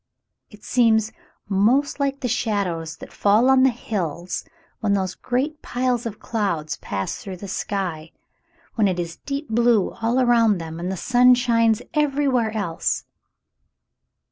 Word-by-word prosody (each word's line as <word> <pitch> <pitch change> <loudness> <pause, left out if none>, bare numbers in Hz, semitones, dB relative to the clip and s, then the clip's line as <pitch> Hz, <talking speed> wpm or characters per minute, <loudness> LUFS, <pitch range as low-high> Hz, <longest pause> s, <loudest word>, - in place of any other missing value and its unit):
It 210 -2 -16
seems 220 -3 +3 0.4
'most 235 +10 +2
like 275 -1 -1
the 250 - -1
shadows 185 -9 -2
that - - -12
fall 215 +6 +4
on 265 -1 +5
the 265 - +6
hills 185 - -4 0.4
when 205 -2 +1
those 190 -2 0
great 275 +8 -2
piles 245 -1 -1
of 215 -2 -7
clouds 170 -9 -2
pass 95 -1 -4
through 190 -2 -7
the 200 - -8
sky, 180 -5 -3 0.6
when 215 -3 +2
it 180 -2 -1
is 170 -1 -4
deep 280 +1 -5
blue 230 -2 +3
all 235 +2 0
around 230 -4 +4
them 165 -1 -7
and 180 +2 -3
the 190 - -4
sun 250 +4 +5
shines 230 -3 +2
everywhere 280 -6 +1
else.' 200 -7 -2
220 Hz, 145 wpm, -22 LUFS, 190-250 Hz, 0.6 s, the